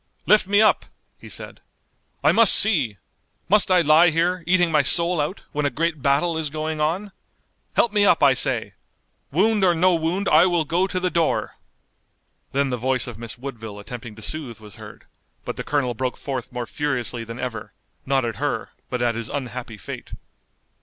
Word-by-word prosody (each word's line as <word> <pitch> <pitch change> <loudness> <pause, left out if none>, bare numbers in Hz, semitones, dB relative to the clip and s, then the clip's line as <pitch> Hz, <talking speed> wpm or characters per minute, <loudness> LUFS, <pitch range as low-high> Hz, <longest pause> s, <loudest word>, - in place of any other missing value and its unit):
"Lift 210 -3 +4
me 205 +2 +4
up!" 215 - +3 0.3
he - - -12
said, - - -7 0.6
"I - - +5
must 230 -2 +6
see! 150 - +3 0.5
Must 205 0 +4
I 180 -1 +5
lie 160 +2 +5
here, 170 +2 0
eating 175 -2 +3
my 150 -2 +4
soul 170 +4 +1
out, 150 +7 -4
when 150 -1 0
a - - 0
great 160 0 -2
battle 150 +5 +1
is 155 -2 -2
going 155 +1 -3
on! 180 +7 -1 0.6
Help 235 - +2
me 205 -1 +3
up, 175 -6 +4
I 140 -2 +6
say! - - +1 0.6
Wound 205 +6 +2
or 175 -2 +4
no 180 +2 +3
wound, 170 +4 -1
I 160 +4 +6
will 175 -3 +1
go 175 +5 +1
to 185 -1 -2
the 180 0 -1
door!" 165 -2 0 1.0
Then 140 0 0
the 125 - -1
voice 130 -1 0
of 120 -3 -8
Miss 115 -1 -8
Woodville 115 -5 -8
attempting 115 +2 -9
to 110 - -10
soothe 135 -7 -5
was 105 -3 -13
heard, - - -12 0.4
but - - -4
the - - -5
colonel 140 -4 -1
broke 125 +2 -3
forth 130 -4 -5
more 120 -1 -4
furiously 125 -4 -2
than 115 +1 -8
ever, 115 -4 -5 0.3
not 135 -2 +1
at 115 -3 -4
her, - - -3 0.2
but 125 -1 -2
at 120 -1 +1
his 115 0 -5
unhappy 125 -5 -5
fate. - - -9
150 Hz, 190 wpm, -22 LUFS, 125-175 Hz, 1.0 s, must